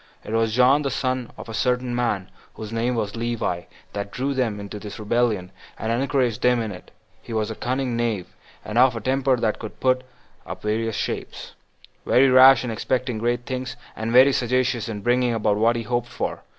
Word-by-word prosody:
It - - -8
was 115 -1 +1
John, 130 +4 +5
the 140 - -1
son 130 -2 -2
of - - -9
a 115 - -7
certain 125 +2 0
man 110 -6 -1 0.2
whose 110 0 -7
name 120 +2 0
was 105 -3 -2
Levi, 115 -7 -2 0.3
that 100 0 -4
drew 135 +6 -2
them 120 -6 -1
into 100 +1 -7
this 105 -1 -8
rebellion, 105 -4 0 0.3
and 110 - -2
encouraged 125 -2 0
them 125 -1 +3
in 110 -2 -3
it. 90 - -11 0.3
He 115 - -8
was 110 0 -1
a - - -5
cunning 130 0 -2
knave, 115 -6 -1 0.4
and 110 +3 0
of 130 -1 +5
a - - -2
temper 130 +3 +1
that 110 -2 -1
could 110 - -8
put 130 0 +2 0.4
on - - -7
various 110 +1 -1
shapes; - - -4 0.5
very 130 +1 +4
rash 130 +1 +8
in 125 - -3
expecting 125 +1 -1
great 120 +1 -1
things, 130 0 -4 0.2
and 110 +1 -3
very 130 +3 +7
sagacious 125 -2 0
in 105 -2 -5
bringing 120 +1 +2
about 105 -2 +1
what 115 +2 +3
he 115 - -2
hoped 120 +1 -1
for. - - -4
120 Hz, 200 wpm, -23 LUFS, 110-125 Hz, 0.5 s, rash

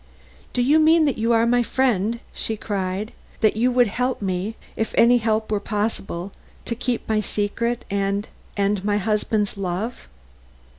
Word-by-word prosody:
"Do 245 - +2
you 295 +5 +5
mean 315 +1 +5
that 280 -6 0
you 230 +2 +2
are 230 0 +4
my 245 +1 +3
friend?" 235 -3 +1
she 220 - -3
cried. 200 0 -3 0.3
"That 215 -2 +4
you 240 +3 +3
would 245 -1 +4
help 250 +4 -1
me, 190 +2 -2 0.2
if 220 - -2
any 245 +1 +6
help 220 -1 0
were 210 - +2
possible, 200 -3 -3 0.3
to - - -2
keep 240 +1 -2
my 220 -1 +2
secret 230 +3 -2
and 200 +1 -1 0.6
my 205 0 +1
husband's 210 0 0
love?" 195 +5 -3
220 Hz, 155 wpm, -23 LUFS, 205-240 Hz, 0.6 s, any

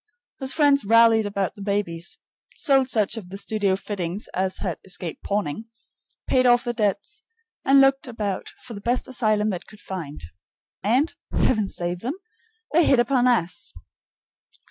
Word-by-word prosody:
His 265 -1 0
friends 285 -2 +4
rallied 225 0 +5
about 200 -2 -2
the 205 - -12
babies, 195 -5 -2 0.4
sold 270 -4 +3
such 215 -2 +1
of 190 -5 -8
the 195 - -7
studio 205 -2 0
fittings 195 -1 -4
as 190 0 -1
had 180 -6 -3
escaped 180 -3 -5
pawning, 205 0 -2 0.6
paid 255 -1 +3
off 240 0 +5
the 240 - -2
debts, 215 - -2 0.4
and 275 +1 +6
looked 270 0 +3
about 210 -5 -3
for 240 - -8
the 200 - -8
best 245 +4 0
asylum 215 -4 +1
they 180 - -3
could 210 +3 -17
find. 165 - -7 0.6
And, 255 - +2 0.2
Heaven 215 -5 +2
save 175 -1 -3
them! 255 - -3 0.6
they 340 +2 +5
hit 270 - +4
upon 245 +1 +3
us! 200 -9 0
215 Hz, 155 wpm, -24 LUFS, 190-250 Hz, 0.6 s, and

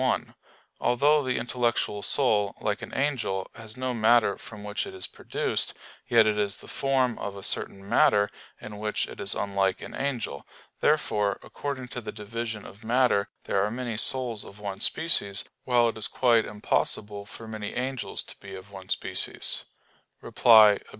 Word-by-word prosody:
1: 130 -1 0 0.5
Although 145 +5 +3
the 130 -2 -1
intellectual 120 -3 0
soul, 105 -6 +2
like 105 -1 -1
an - - -7
angel, 125 -9 -1
has 115 0 -11
no 130 0 -1
matter 115 -2 +4
from 105 -2 -11
which 105 0 -3
it - - -9
is 95 - -1
produced, - - -2 0.3
yet 115 -2 +6
it 105 -1 +1
is 100 -1 0
the - - -12
form 130 -3 +1
of 100 -1 -4
a 100 - -9
certain 100 0 -2
matter; 105 0 +4 0.3
in 105 0 -9
which 105 0 -1
it - - -9
is - - -1
unlike 100 -2 0
an - - -9
angel. 125 - -3 0.4
Therefore, 105 -1 +2
according 135 -3 -5
to 125 - -5
the - - -6
division 110 0 -5
of 100 - -12
matter, 115 -3 +2
there 100 - +1
are 105 - 0
many 120 0 -4
souls 120 -1 +3
of 100 - -12
one 100 -2 -5
species; 130 - +2 0.2
while 120 -2 +4
it 115 - -6
is 105 - +4
quite 115 -3 +3
impossible 105 0 -2
for 115 - -10
many 110 -2 -6
angels 130 0 -3
to - - -9
be 100 -1 -9
of 95 +1 -11
one 95 -1 -10
species. - - -1 0.5
Reply 110 -3 +7
Obj. - - -15
110 Hz, 175 wpm, -27 LUFS, 100-125 Hz, 0.5 s, Reply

